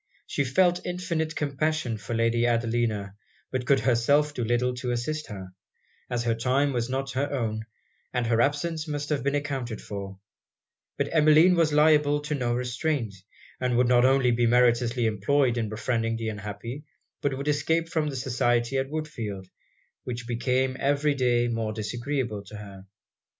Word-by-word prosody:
She 140 - -1
felt 175 +6 +2
infinite 170 -3 -2
compassion 150 -3 -1
for 105 +3 -4
Lady 115 +1 +2
Adelina; 115 -4 0 0.4
but 130 -1 -3
could 135 -2 +4
herself 140 +5 +3
do 125 - -3
little 120 +2 +1
to 125 0 -3
assist 140 +6 -2
her, 95 -4 -8 0.6
as 120 -1 -1
her 115 -1 +1
time 130 +5 +1
was 120 0 -1
not 135 +1 -2
her 140 +2 -1
own 110 -5 -2 0.5
and 125 -2 -1
her 115 0 +2
absence 155 +4 0
must 145 -1 -3
have 150 -4 0
been 140 +3 0
accounted 135 -6 -3
for: 100 -1 -7 0.8
but - - 0
Emmeline 155 +3 +6
was 165 -3 +3
liable 150 -1 +4
to 150 +1 -3
no 120 -4 0
restraint; 125 -1 -1 0.5
and 125 -2 0
would 125 0 +4
not 120 0 +5
only 130 -1 +4
be 120 0 +2
meritoriously 120 0 +3
employed 120 +5 +2
in 115 -3 -1
befriending 115 +1 -1
the 115 -1 -3
unhappy, 105 +6 -6 0.4
but 135 -2 -1
would 140 +2 -5
escape 160 +3 +1
from 160 -3 -1
the 140 - -5
society 120 0 +1
at 135 0 -2
Woodfield, 115 -12 -5 0.5
which 120 -1 -5
became 125 +2 0
every 145 +1 +2
day 120 -3 +2
more 115 -2 -2
disagreeable 120 0 -3
to 105 - -11
her. 100 -2 -11
125 Hz, 165 wpm, -26 LUFS, 115-145 Hz, 0.8 s, Emmeline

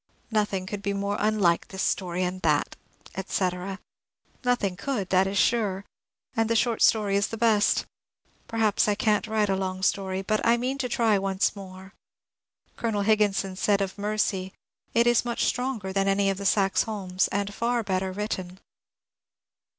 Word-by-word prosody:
Nothing 205 -3 0
could 200 +1 -5
be 200 0 -1
more 200 +1 -1
unlike 205 -5 +2
than - - -11
this 190 - -2
story 180 -1 -1
and 185 +1 -3
that," - - +1 0.4
etc. 190 0 -2 0.7
Nothing 245 -7 +1
could, 205 -2 -3
that 190 0 +4
is 195 +1 -2
sure, 205 -4 +1 0.5
and 225 0 +1
the 230 - +2
short 230 0 +1
story 210 -3 +3
is 200 +1 +1
the 225 - -6
best. 220 -2 +3 0.6
Perhaps 220 -3 +1
I 210 - +2
can't 215 0 +1
write* 215 -1 +1
a 195 - +1
long 190 0 -3
story, 190 0 0
but 215 +2 0
I 235 +1 +4
mean 255 +3 -2
to 250 -2 -2
tiy 220 -4 +2
once 195 +1 0
more. 190 0 -11 0.8
Colonel 215 -3 -1
Higginson 200 -3 +2
said 200 0 +2
of 195 -1 -2
'^ - - -29
Mercy 200 -2 -1 0.2
" - - -40
^^ - - +4
It 235 - +5
is 240 -1 +4
much 240 -1 -1
stronger 240 -7 -2
than 195 0 +1
any 195 0 +2
of 195 - -5
the 200 - 0
Saxe 195 -1 +3
Holms, 195 -4 -1
and 200 0 -2
far 235 +1 0
better 190 -1 -1
written." 185 -2 -4
200 Hz, 180 wpm, -26 LUFS, 190-220 Hz, 0.8 s, It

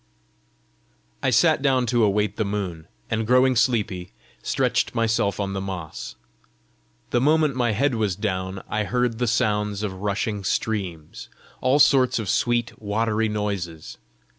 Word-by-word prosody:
I - - +1
sat - - +4
down 130 -3 +2
to 120 -1 +2
await 105 0 +1
the 110 - +1
moon, 95 -6 -4 0.2
and 110 0 -1
growing 125 +1 +4
sleepy, 110 -7 0 0.3
stretched 125 -2 0
myself 115 -3 +1
on 100 -1 -2
the 95 - -3
moss. 80 -10 -6 1.0
The 120 - +2
moment 150 0 +3
my 120 -3 +1
head 135 +6 +1
was 105 -5 0
down, 95 -2 -3
I 110 0 -1
heard 125 -1 0
the 125 - +1
sounds 105 -2 0
of 100 -3 -2
rushing 105 0 -2
streams 95 -7 -3 0.3
all 130 +2 +3
sorts 135 -3 +4
of 110 -5 -3
sweet 120 -1 0
watery 110 +1 0
noises. 100 -7 -4
110 Hz, 140 wpm, -24 LUFS, 100-120 Hz, 1.0 s, sat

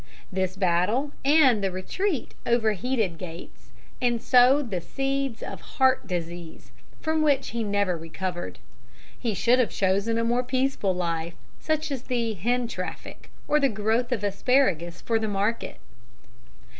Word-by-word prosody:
This 185 0 -1
battle 190 +10 +1
and 270 -7 +5
the 195 - +2
retreat 275 - -2
overheated 220 -4 +1
Gates 165 -8 -10 0.3
and 240 -2 +2
sowed 255 +1 +4
the 180 -2 -1
seeds 270 +3 -2
of - - -7
heart 260 -5 +1
disease, 170 -2 -6 0.3
from 315 0 0
which 285 -3 +2
he 235 -1 -2
never 200 -3 +1
recovered. 175 +2 -5 0.6
He 230 -4 -1
should 240 +7 +3
have 245 - +3
chosen 200 +4 +1
a 230 - +1
more 240 +2 +2
peaceful 255 -6 0
life, 170 -1 -2 0.2
such 310 -1 -1
as 270 -3 -2
the 235 -3 -1
hen 240 +6 0
traffic, 185 -5 -7 0.2
or 300 - +3
the 275 -2 +3
growth 220 +3 0
of 225 -5 -1
asparagus 195 - +1
for 225 -1 +1
the 220 - -1
market. 205 +3 -1
225 Hz, 145 wpm, -26 LUFS, 185-255 Hz, 0.6 s, and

